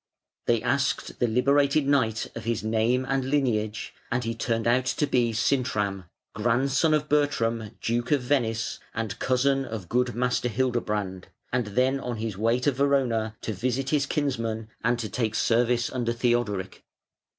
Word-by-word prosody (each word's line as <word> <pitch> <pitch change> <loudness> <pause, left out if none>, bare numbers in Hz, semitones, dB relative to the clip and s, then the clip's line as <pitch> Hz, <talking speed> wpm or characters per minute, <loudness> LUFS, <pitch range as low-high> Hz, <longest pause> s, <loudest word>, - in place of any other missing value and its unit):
They 115 -2 +2
asked 130 +2 0
the 120 - +3
liberated 140 +5 +3
knight 115 -6 +1
of - - -6
his 115 -1 -1
name 115 +4 +1
and 135 -1 0
lineage, 115 -6 0 0.2
and 125 0 0
he 115 0 -2
turned 115 0 -1
out 125 +2 +2
to 150 - +1
be 125 -4 +2
Sintram, 105 -5 0 0.3
grandson 135 +7 +2
of 150 0 -1
Bertram, 115 -8 0
Duke 120 +1 -1
of 145 -3 +3
Venice, 115 -4 0 0.2
and 110 -4 -3
cousin 135 +1 +2
of 110 -8 -6
good 125 0 +1
Master 125 0 0
Hildebrand, 105 -6 -1 0.3
and 125 -3 +1
then 130 +6 +1
on 125 -3 -4
his 110 -2 -3
way 115 +5 +1
to 145 - +3
Verona 125 -5 +1
to 110 - -3
visit 130 +6 -1
his 145 -2 +2
kinsman 115 -7 -2
and 120 +1 +2
to 115 -2 -3
take 110 +1 -2
service 120 +1 +2
under 120 -2 -1
Theodoric. 115 -6 -1
120 Hz, 160 wpm, -26 LUFS, 110-130 Hz, 0.3 s, the